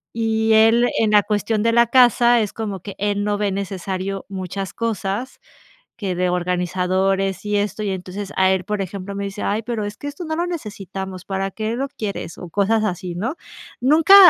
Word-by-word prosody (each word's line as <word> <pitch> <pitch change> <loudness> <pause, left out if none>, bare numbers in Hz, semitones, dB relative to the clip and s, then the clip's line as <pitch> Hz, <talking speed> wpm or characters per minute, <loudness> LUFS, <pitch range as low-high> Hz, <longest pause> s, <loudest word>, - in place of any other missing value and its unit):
Y 220 -1 +2
él 225 +2 +5
en 220 -1 +3
la 210 -1 +6
cuestión 210 +1 0
de 230 - +3
la 235 0 +5
casa 240 -1 +5
es 210 -2 -1
como 205 -5 -4
que 200 - -7
él 205 0 0
no 205 0 0
ve 205 -2 +1
necesario 195 0 -3
muchas 190 0 -4
cosas, 225 +1 -3 0.6
que 190 -4 -2
de 180 0 +1
organizadores 185 +2 0
y 205 0 +1
esto. 210 +1 -1
Y 200 - -1
entonces 190 +2 -5
a 190 0 +4
él, 190 -1 +1
por 210 -1 -1
ejemplo, 195 +1 -5
me 200 0 -2
dice: 200 +1 -5
"Ay, 210 +2 0
pero 225 -2 -3
es 205 +1 -6
que 290 - -6
esto 295 +4 -6
no 315 0 -2
lo 345 +1 0
necesitamos. 195 - -6
¿Para 195 0 -2
qué 220 +3 -2
lo 275 +2 -1
quieres?", 205 - -5
o 175 - -8
cosas 215 +4 +2
así, 180 -3 -2
¿no? 230 - -2 0.4
Nunca 310 +9 +6
205 Hz, 195 wpm, -21 LUFS, 190-225 Hz, 0.6 s, la